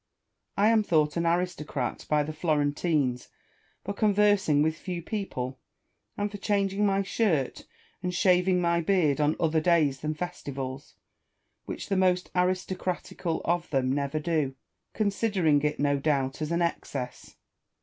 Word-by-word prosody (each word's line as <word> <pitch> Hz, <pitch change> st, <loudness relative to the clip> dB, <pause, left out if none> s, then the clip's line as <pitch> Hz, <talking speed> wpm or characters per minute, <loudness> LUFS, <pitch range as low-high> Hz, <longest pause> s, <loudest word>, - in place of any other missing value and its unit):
I 205 Hz, +2 st, +5 dB
am 225 Hz, -1 st, +4 dB
thought 155 Hz, -7 st, +2 dB
an 170 Hz, 0 st, 0 dB
aristocrat 165 Hz, -7 st, -2 dB
by 150 Hz, -1 st, +3 dB
the 155 Hz, +2 st, -5 dB
Florentines 145 Hz, -4 st, 0 dB, 0.6 s
for 200 Hz, -, -2 dB
conversing 205 Hz, -7 st, +3 dB
with 160 Hz, 0 st, +1 dB
few 180 Hz, +1 st, -5 dB
people, 160 Hz, -, -4 dB, 0.6 s
and 205 Hz, 0 st, -1 dB
for 205 Hz, -, -7 dB
changing 200 Hz, 0 st, +1 dB
my 195 Hz, 0 st, +1 dB
shirt 185 Hz, -, 0 dB, 0.3 s
and 180 Hz, -1 st, -2 dB
shaving 180 Hz, 0 st, +3 dB
my 170 Hz, -1 st, +2 dB
beard 160 Hz, -5 st, +2 dB
on 150 Hz, +1 st, +2 dB
other 160 Hz, -1 st, +2 dB
days 155 Hz, -5 st, +3 dB
than 155 Hz, +2 st, -3 dB
festivals; 140 Hz, -5 st, -6 dB, 0.7 s
which -, -, -6 dB
the 195 Hz, -, +1 dB
most 180 Hz, -1 st, +2 dB
aristocratical 180 Hz, -2 st, -1 dB
of 175 Hz, 0 st, 0 dB
them 130 Hz, -3 st, +1 dB
never 140 Hz, +1 st, -1 dB
do, 150 Hz, -4 st, -1 dB, 0.4 s
considering 195 Hz, -8 st, +2 dB
it, 150 Hz, 0 st, -1 dB
no 145 Hz, -1 st, +2 dB
doubt, 135 Hz, -1 st, 0 dB
as 155 Hz, +1 st, -2 dB
an 170 Hz, +1 st, +1 dB
excess. 135 Hz, -6 st, -4 dB
170 Hz, 140 wpm, -27 LUFS, 145-185 Hz, 0.7 s, I